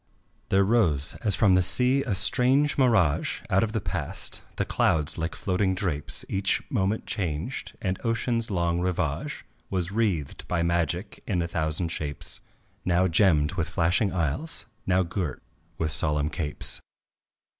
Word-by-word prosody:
There 95 +1 +4
rose 90 - +2
as 105 -4 +5
from 100 -4 +4
the 90 - +5
sea 125 +8 +4
a 110 -7 -1
strange 130 +9 +3
mirage 115 - +2
Out 95 - +4
of 110 - 0
the 110 - -1
past; - - -4
the - - -1
clouds 80 +1 +1
like 80 +1 -2
floating 95 0 0
drapes 85 -6 -1
Each 95 +1 +1
moment 105 -3 0
changed, 90 - -3
and 95 -2 -2
ocean's 115 0 0
long 85 -3 0
rivage 90 -1 -2 0.2
Was 90 -2 -1
wreathed 100 -10 -1
by 85 -1 0
magic 85 +2 -1
in 95 -5 0
a - - -2
thousand 80 0 -1
shapes, 75 -3 -4 0.4
Now 90 +1 +2
gemmed 80 -3 +3
with 85 -3 -2
flashing 90 +3 +1
isles, 90 - -2 0.2
now 95 0 +3
girt 85 -5 -4 0.3
with 80 -1 -1
solemn 75 +1 +1
capes. 75 -2 -3
90 Hz, 145 wpm, -26 LUFS, 80-105 Hz, 0.4 s, as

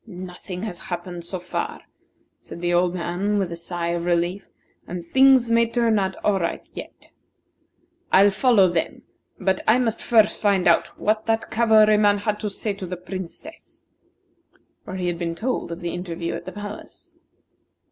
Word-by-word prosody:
"Nothing 180 -1 -8
has 190 -6 -6
happened 175 0 -5
so 185 +1 -4
far," 435 - -4 0.6
said - - -10
the 175 0 0
old 175 +1 +2
man, 185 +4 -1
with 190 -4 -1
a - - -4
sigh 170 0 -4
of 170 0 -1
relief; 175 +2 0 0.4
"and 175 -1 -6
things 260 +2 +5
may 230 0 +4
turn 230 -3 +2
out 190 -1 -1
all 200 -2 +3
right 170 - -3
yet. - - -10 1.0
I'll 200 +2 +6
follow 210 -2 +4
them, 170 -2 -2 0.4
but 190 0 0
I 220 - +6
must 230 -3 0
first 220 -3 +3
find 200 -4 +2
out 170 - +4
what 215 +1 0
that 225 0 0
cavalryman 215 -2 +5
had 210 +1 -2
to 210 - -2
say 205 +1 -3
to 195 -2 -7
the 180 +1 -5
Princess." 190 - -9 1.0
For 185 - -7
he 185 -1 -3
had 175 -1 -2
been 170 -1 -2
told 250 -4 -2
of 170 - -6
the 170 -1 -3
interview 170 -1 -4
at - - -6
the - - -6
palace. 205 0 -10
190 Hz, 170 wpm, -23 LUFS, 175-215 Hz, 1.0 s, I'll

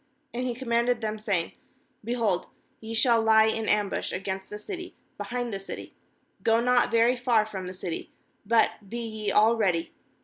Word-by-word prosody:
4And 250 +1 -2
he 245 - -2
commanded 235 -1 +1
them, 215 -1 -3
saying: 195 -6 -1 0.5
'Behold, 225 -5 0 0.3
y6 225 0 -4
shall 230 -1 +5
lie 220 0 +6
in 220 0 0
ambush 210 -2 0
against 190 0 -4
the 210 - -6
city, 360 - -7 0.2
behind 245 -2 -4
the 195 - -2
city; 195 - -8 0.5
go 225 0 +3
not 245 +1 +3
very 230 +2 +4
far 240 -3 +2
from 190 -4 -6
the 185 - -6
city, 180 -2 -5 0.3
but 215 -2 +1
be 235 - -4
ye 215 -2 -3
all 220 +3 +5
ready. 180 -7 0
220 Hz, 170 wpm, -27 LUFS, 205-235 Hz, 0.5 s, lie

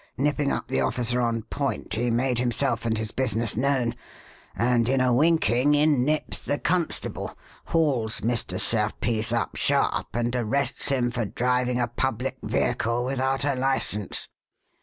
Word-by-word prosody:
Nipping 145 +1 +1
up - - -3
the 65 - 0
officer 120 - +1
on 115 -2 0
point, 140 +3 -3
he 120 +2 0
made 120 +1 +1
himself 120 -1 0
and 110 -1 0
his 110 0 -3
business 115 -4 0
known, 125 -1 +1 0.6
and, 120 -1 +2
in 135 0 +2
a 130 -1 +3
winking, 145 -2 +3
in 145 -3 +3
nips 155 +3 -1
the 145 - -2
constable, 175 +1 -2 0.3
hauls 130 -8 0
Mr. 115 0 -1
Serpice 110 +1 0
up 120 -1 -1
sharp, - - +1
and 120 +1 0
arrests 125 +5 0
him 125 -3 +1
for 120 -1 -2
driving 125 +3 0
a 120 - +1
public 130 +2 -2
vehicle 115 +2 0
without 135 +1 0
a 145 - +2
license." 130 -6 0
125 Hz, 150 wpm, -25 LUFS, 115-135 Hz, 0.6 s, a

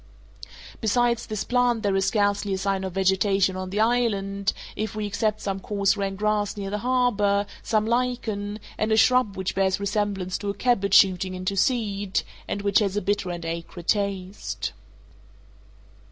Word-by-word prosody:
Besides 235 +1 +1
this 215 -3 -3
plant 245 -2 +1
there 200 -1 +1
is 195 0 +2
scarcely 205 -1 +1
a - - -3
sign 195 0 -1
of 190 -2 -4
vegetation 190 0 +2
on 185 0 -4
the 200 +3 -2
island, 205 -4 +1 0.2
if 215 -1 -3
we 215 -1 -2
except 210 +1 -1
some 195 -1 -2
coarse 200 0 +1
rank 195 -1 -3
grass 210 0 0
near 195 -1 -4
the 210 - -2
harbor, 210 -5 +2 0.2
some 215 -1 +1
lichen, 225 -4 -1 0.2
and 215 +1 0
a 220 - +4
shrub 250 -4 +4
which 190 -1 -2
bears 190 0 +1
resemblance 200 -2 -1
to 205 - -3
a 200 - -2
cabbage 200 -4 +2
shooting 185 -1 +4
into 185 +2 -2
seed, 205 -3 0 0.2
and 200 - -3
which 200 -1 +4
has 205 -2 0
a - - +4
bitter 200 -1 0
and 175 -1 -5
acrid 170 +1 -6
taste. 190 - -2
200 Hz, 170 wpm, -25 LUFS, 195-215 Hz, 0.2 s, a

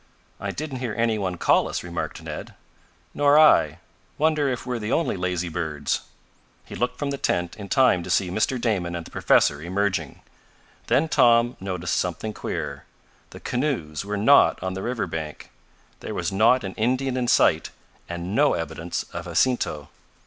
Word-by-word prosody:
"I - - -4
didn't 145 -4 -5
hear 120 -4 -3
any 115 -2 +1
one 90 -3 -2
call - - +3
us," - - -3
remarked 85 -1 -5
Ned. - - -7 0.6
"Nor 145 0 +4
I. 155 -1 +5 0.4
Wonder 155 -2 +2
if 125 -2 -3
we're 125 -2 -2
the 105 0 -4
only 165 - +1
lazy 90 -1 -2
birds." 80 -4 -2 0.6
He - - -11
looked 125 +1 -2
from 145 -1 -2
the 140 - -4
tent 85 0 -1
in 100 -2 -9
time 130 -9 +4
to 85 - -8
see 90 -1 +1
Mr. 110 +6 0
Damon 95 -8 -1
and 85 -1 -5
the - - -13
professor 75 0 +3
emerging. 90 -3 -2 0.7
Then 145 +5 +3
Tom 120 -4 +4
noticed 90 -2 -2
something 90 +5 -2
queer. - - -5 0.4
The - - -11
canoes 125 - -2
were 105 +1 -3
not 125 +8 +5
on 95 0 -2
the 95 - -5
river 120 0 -2
bank. 80 -2 -6 0.5
There - - -6
was 85 +1 -2
not 115 +6 +4
an 95 -1 -5
Indian 130 +3 0
in 125 -1 -1
sight, - - +3 0.4
and 85 +2 -5
no 145 +3 +4
evidence 80 +1 -4
of 85 +1 -5
Jacinto. 85 - 0
100 Hz, 170 wpm, -24 LUFS, 85-125 Hz, 0.7 s, I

